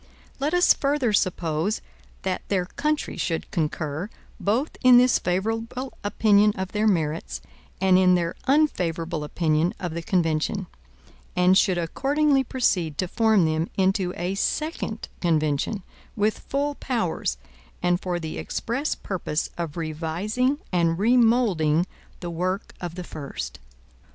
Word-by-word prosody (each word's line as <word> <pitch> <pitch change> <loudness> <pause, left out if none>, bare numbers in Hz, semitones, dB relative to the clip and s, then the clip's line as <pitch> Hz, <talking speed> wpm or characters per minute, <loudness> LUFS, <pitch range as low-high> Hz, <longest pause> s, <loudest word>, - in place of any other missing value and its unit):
Let 295 +5 0
us 355 - +6
further 275 -5 0
suppose 180 0 0 0.4
that 185 -1 -1
their 185 -3 0
country 300 +10 -2
should 165 -2 -2
concur, 155 +1 -2 0.3
both 235 +9 0
in 250 -1 +8
this 250 0 +5
favorable 225 +8 -2
opinion 205 0 +4
of 190 0 -3
their 215 +1 +1
merits, 160 -5 0 0.4
and 185 -1 +5
in 180 -1 +5
their 170 -1 0
unfavorable 170 - +1
opinion 155 +2 +1
of 175 -3 -4
the 170 - -3
convention; 175 +1 0 0.7
and 180 +1 +5
should 190 -2 +3
accordingly 275 - +2
proceed 180 - 0
to 185 - 0
form 220 -2 +3
them 160 +1 0
into 190 -1 +2
a 175 +3 -2
second 230 0 -2
convention, 160 +3 0 0.3
with 215 0 +1
full 285 +1 -1
powers, 225 - -2 0.5
and 175 0 +2
for 180 -1 -2
the 160 -2 -5
express 260 +7 -2
purpose 170 -5 -3
of 170 -2 -4
revising 170 - -1
and 170 -2 +2
remoulding 215 -8 +3 0.4
the 175 -1 -4
work 185 +3 -2
of 175 -2 -5
the 180 - -5
first. 70 - -6
185 Hz, 130 wpm, -25 LUFS, 165-225 Hz, 0.7 s, in